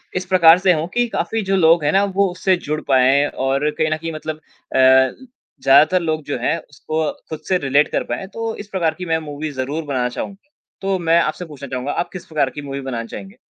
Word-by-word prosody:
इस 185 0 -2
प्रकार 175 -2 +6
से 185 -1 +4
हो 160 0 -1
कि 240 0 +2
काफ़ी 225 - -1
जो 195 - +3
लोग 165 -3 +4
हैं 145 - +2
ना, 195 +1 +3
वो 200 0 +1
उससे 185 +1 +1
जुड़ 155 +1 -1
पाएँ 135 +1 +4
और 135 +3 -1
कहीं 155 +1 -1
न 155 - +1
कहीं 165 +1 -5
मतलब 155 0 -5
अ, 155 - -9
ल 130 - +4 0.4
ज़्यादातर 145 +7 +5
लोग 155 -2 -1
जो 145 - -3
हैं 125 - 0
उसको 155 +2 -3 0.2
खुद 155 - -5
से 185 - +3
रिलेट 145 -1 +2
कर - - 0
पाएँ। 120 - -4
तो 225 0 -3
इस 205 - -8
प्रकार 170 -5 0
की 180 - -5
मैं 165 -1 +1
मूवी 155 0 -5
ज़रूर 140 +4 -3
बनाना 130 -4 -1
चाहूँगा। 200 - -7 0.3
तो 195 0 0
मैं 165 0 +3
आपसे 160 +3 -3
पूछना 145 -4 -10
चाहूँगा 130 +2 -3
आप - - -2
किस 185 - -8
प्रकार 150 -4 0
की 145 - -8
मूवी 140 -1 -5
बनाना 120 -4 -4
चाहेंगे? 195 - -10
155 Hz, 230 wpm, -20 LUFS, 140-185 Hz, 0.4 s, प्रकार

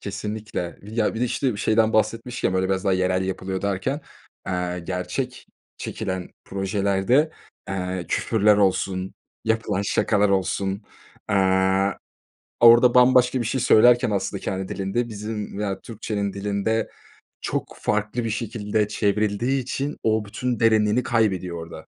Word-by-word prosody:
Kesinlikle. 105 -3 -5
Ya, 110 +2 -1
bir 115 - -4
de, - - +3
işte, 125 -2 -1
şeyden 110 +1 +2
bahsetmişken, 115 0 0
böyle, 95 0 +1
biraz 95 0 -1
daha 95 - +2
yerel 95 0 +1
yapılıyor 95 0 -3
derken, 100 +9 -1 0.5
eee, 90 -1 -2
gerçek 95 +9 -4 0.3
çekilen 95 -1 -4 0.2
projelerde, 100 +9 +1 0.4
eee, 90 -3 -3
küfürler 105 -2 +3
olsun, 95 -1 0 0.3
yapılan 110 -3 0
şakalar 105 0 +2
olsun. 95 +1 0 0.5
Eee, 95 0 +3 0.7
orada 120 +1 +7
bambaşka 125 0 +5
bir - - -3
şey 130 +2 -1
söylerken 120 0 +5
aslında 100 - -2
kendi 95 0 -3
dilinde 100 +5 -2
bizim 105 -1 -5
veya 100 -2 -3
Türkçenin 105 -3 -4
dilinde 105 +2 -1 0.5
çok - - -3
farklı 105 +3 -1
bir 115 - -2
şekilde 105 -1 -1
çevrildiği 105 +5 0
için 140 +4 -3
o 110 -1 +1
bütün 120 +3 -3
derinliğini 110 +1 +3
kaybediyor 95 -8 0
orada. 80 -1 -11
105 Hz, 130 wpm, -23 LUFS, 95-115 Hz, 0.7 s, orada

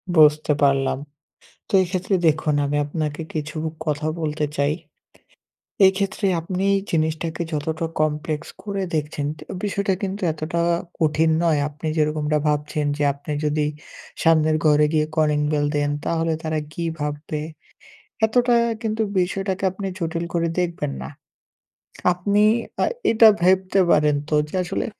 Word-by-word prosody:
বুঝতে 150 -1 +5
পারলাম। 135 -1 +2 0.7
তো - - -12
এক্ষেত্রে 185 +2 -1
দেখুন 155 -1 +2
আমি 145 +1 -1
আপনাকে 150 +1 -3
কিছু 155 0 -4 0.3
কথা 150 0 -1
বলতে 150 -1 -1
চাই। 140 +1 +2 1.1
এক্ষেত্রে 195 +2 0
আপনি 180 +3 -3 0.3
জিনিসটাকে 160 +1 -1
যতটা 155 +2 -2
কমপ্লেক্স 155 +1 -1
করে 200 -1 -3
দেখছেন, 150 -1 -2
তো - - -12 0.2
বিষয়টা 200 -1 0
কিন্তু 195 +1 -3
এতটা 155 +2 -3 0.4
কঠিন 160 0 +2
নয়। 160 -3 +3
আপনি 150 +1 -9
যেরকমটা 150 -1 +1
ভাবছেন 150 0 -1
যে 145 - -2
আপনি 140 +2 -7
যদি 150 0 +1 0.6
সামনের 155 -2 +4
ঘরে 150 0 +5
গিয়ে 155 -1 +2
কলিং 150 -2 +2
বেল 145 -1 +1
দেন 145 0 +1
তাহলে 165 0 0
তারা 155 -1 -1
কি 170 - -4 0.2
ভাববে? 150 +1 -3 0.9
এতটা 245 +2 +2 0.3
কিন্তু 220 0 -1 0.2
বিষয়টাকে 190 +1 -2
আপনি 195 +2 -6
জটিল 165 -1 -2
করে 170 -1 +1
দেখবেন 170 - -2
না। 65 - -6 1.0
আপনি 200 +4 +1 0.4
আ - - +4 0.3
এটা 225 0 +7 0.2
ভাবতে 185 +1 +3
পারেন 150 -1 +4
তো 155 - +2
যে - - -6
আসলে 175 - -2
155 Hz, 135 wpm, -22 LUFS, 150-180 Hz, 1.1 s, এটা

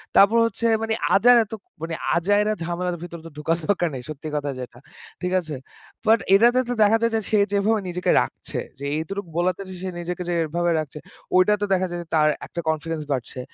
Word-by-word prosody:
তারপর 210 +4 +6
হচ্ছে 230 0 -3 0.2
মানে 225 0 0 0.2
আজাইরা 240 +3 +6
তো - - -3 0.3
মানে 165 0 -3 0.2
আজাইরা 205 +5 +2
ঝামেলার 175 +1 -2
ভিতর 170 -1 -7
তো - - -7
ঢুকার 160 +2 0
দরকার 175 -4 +2
নেই 125 - -6
সত্যি 155 +1 -7
কথা 145 -1 -1
যেটা। 125 -1 -8 0.4
ঠিক 180 +1 -1
আছে? 155 -4 -6 0.5
But 225 +1 +5
এটাতে 240 +5 +6
তো - - +1
দেখা 215 +2 +5
যায় 230 - +2
যে 225 - +2
সে 215 - +4 0.2
যেভাবে 210 +2 +2
নিজেকে 180 +1 0
রাখছে, - - -6 0.2
যে 140 - -5
এতটুক 195 +3 -5
বলাতে 180 +2 +1
যে - - -7
সে 190 - -2
নিজেকে 180 +1 -4
যে 175 - 0
এভাবে 170 +2 0
রাখছে, 150 -1 -6 0.4
ওইটাতে 205 +3 +4
দেখা 185 0 +2
যায় 175 0 -4
যে - - -24
তার 155 -1 +4 0.2
একটা 170 - -7
confidence 160 0 -2
বাড়ছে। 130 -1 -3
180 Hz, 200 wpm, -23 LUFS, 160-205 Hz, 0.5 s, তারপর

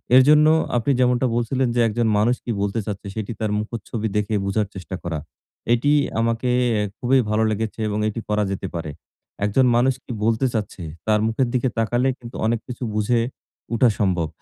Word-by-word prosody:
এরজন্য 150 +4 +7 0.3
আপনি 120 +4 +1
যেমনটা 125 0 +3
বলছিলেন 125 +2 0
যে, - - +2
একজন 115 +1 0
মানুষ 120 +4 +3
কী 120 - -1
বলতে 100 +3 -1
চাচ্ছে, 100 -2 -5
সেটি 110 0 -4
তার 110 -1 -1
মুখচ্ছবি 110 0 -4
দেখে 105 +1 -1
বোঝার 100 +1 0
চেষ্টা 95 0 -6
করা। 85 -3 -3 0.5
এটি 125 +5 +2 0.3
আমাকে 115 +2 0 0.3
এ - - +1 0.2
খুবই 130 +2 +3
ভালো 110 +1 +2
লেগেছে 110 +1 -3
এবং 105 0 -1
এটি 110 +1 -3
করা 105 0 +2
যেতে 95 - -3
পারে। 80 -3 -4 0.5
একজন 115 +6 +3
মানুষ 130 +3 +3
কী - - -9
বলতে 115 +3 +2
চাচ্ছে? 105 -4 -3 0.2
তার 105 -1 +4
মুখের 120 +3 +1
দিকে 125 0 +1
তাকালে 120 +3 +1
কিন্তু 120 0 -10
অনেক 115 +1 +1
কিছু 125 0 -6
বুঝে 110 +3 +2 0.5
উঠা 120 +1 +4
সম্ভব। 90 -5 +1
115 Hz, 180 wpm, -22 LUFS, 105-125 Hz, 0.5 s, এরজন্য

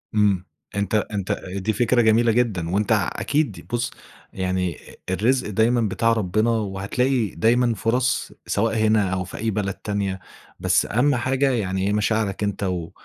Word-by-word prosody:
إمم 100 -3 +2 0.3
أنت 100 +1 0
أنت 100 -2 -1 0.2
دي 100 +3 -1
فكرة 120 +3 +3
جميلة 115 +1 +4
جدًا، 110 -8 0
وأنت 100 +3 0
ع - - +3
أكيد 135 - -1
بُصّ، 120 0 0 0.4
يعني 95 -2 -1 0.3
الرزق 115 +5 +1
دايمًا 115 +4 +2
بتاع 115 +2 +1
ربنا، 110 +1 +1
وهتلاقي 110 +4 0
دايمًا 120 +1 +3
فُرَص 125 +5 0 0.2
سواء 115 +2 +1
هنا 110 -3 +3
أو 95 -1 -1
في - - -9
أي 110 +1 -1
بلد 100 -1 -1
تانية، 100 -2 -3 0.4
بس - - +2
أهم 130 +6 +2
حاجة 135 +3 +1
يعني 95 -5 -1
هي 100 - +1
مشاعرك 105 -1 0
أنت 100 -1 -2
و 90 -3 -2
105 Hz, 155 wpm, -23 LUFS, 95-120 Hz, 0.4 s, جميلة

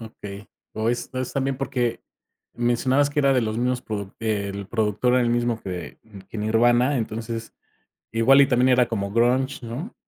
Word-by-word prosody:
Okey, 105 -2 -9 0.3
o 110 +1 -1
es 120 - -3
es 130 -1 -3
también 135 -1 -1
porque 125 -3 -1 0.5
mencionabas 130 +4 +2
que 145 - +1
era 140 -1 +4
de 130 - +3
los 110 -1 -2
mismos 125 0 0
produ 100 -3 -5
eh, 105 -3 -1
el 100 -1 -6
productor 110 +3 +1
era 125 - +4
el 120 - +1
mismo 120 -1 0
que 90 -5 -6 0.3
que 115 - -7
Nirvana, 120 +5 +3
entonces 115 0 -5 0.6
igual 130 +5 +5
y 140 - +5
también 125 0 +3
era 125 -1 +4
como 100 -3 -3
grunge, 125 +3 +1
¿no? 140 - -6
120 Hz, 180 wpm, -24 LUFS, 110-130 Hz, 0.6 s, igual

